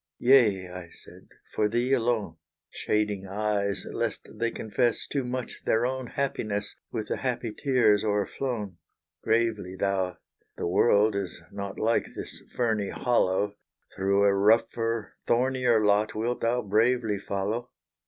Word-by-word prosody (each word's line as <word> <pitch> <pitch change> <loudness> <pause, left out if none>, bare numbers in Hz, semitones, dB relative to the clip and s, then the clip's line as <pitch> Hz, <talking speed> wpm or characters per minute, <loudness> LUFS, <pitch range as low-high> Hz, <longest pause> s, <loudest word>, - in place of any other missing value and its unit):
"Yea," 115 -8 +4
I 90 -1 -9
said, - - -15 0.3
"for 105 - +2
thee 120 +4 +1
alone," 115 -9 0 0.3
Shading 105 -2 -1
eyes 100 0 -1
lest - - -3
they 115 +2 -1
confess 115 +2 0
Too 140 -2 -2
much 125 0 -5
their 115 +2 +2
own 130 0 -2
happiness, 110 -7 -2 0.2
With 110 -2 -4
the - - -1
happy 125 -4 -2
tears 120 -7 +3
o'erflown. 105 -1 -2 0.4
Gravely 110 -5 0
thou 95 -2 -1 0.4
"The - - -3
world 100 +4 +3
is 100 -3 -3
not 100 -1 -6
Like 115 +2 0
this - - -7
ferny 110 -5 0
hollow 105 -4 +1 0.4
Through 100 +1 +2
a 100 -1 +5
rougher, 115 +2 +2
thornier 125 -2 +2
lot 105 +1 +2
Wilt 115 +3 -1
thou 120 +2 +1
bravely 110 +1 +2
follow?" 100 +5 -3
110 Hz, 135 wpm, -27 LUFS, 100-120 Hz, 0.4 s, a